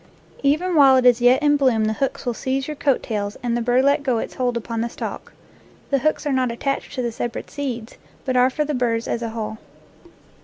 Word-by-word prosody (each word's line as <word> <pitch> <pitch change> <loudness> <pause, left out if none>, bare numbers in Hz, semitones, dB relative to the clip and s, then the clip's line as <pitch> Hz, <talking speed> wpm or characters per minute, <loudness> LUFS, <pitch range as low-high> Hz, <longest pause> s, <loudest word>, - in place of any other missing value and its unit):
Even 310 +6 +1
while 275 -3 +7
it 255 - +2
is 245 -1 +5
yet 250 +4 +4
in 290 0 +4
bloom 250 -6 +2
the 215 - 0
hooks 270 +4 -3
will 245 - 0
seize 265 +3 -2
your 305 - -4
coat 280 -2 +1
tails 205 -2 -3
and 235 -1 0
the 240 - -1
burr 245 +2 +2
let 280 +1 +3
go 260 -4 0
its - - -4
hold 245 -2 -1
upon 230 0 -4
the 235 - -2
stalk. - - -7 0.6
The 275 - +3
hooks 310 +4 0
are 290 - 0
not 255 -2 +1
attached 275 +5 -3
to 255 - -2
the 235 - -1
separate 235 +1 -5
seeds, 250 -6 -5 0.3
but 260 -1 -1
are 250 +1 +5
for 300 +3 -1
the 300 - -2
burrs 235 -3 0
as 235 - -2
a 230 - -3
whole. 220 -1 -5
250 Hz, 235 wpm, -22 LUFS, 235-275 Hz, 0.6 s, while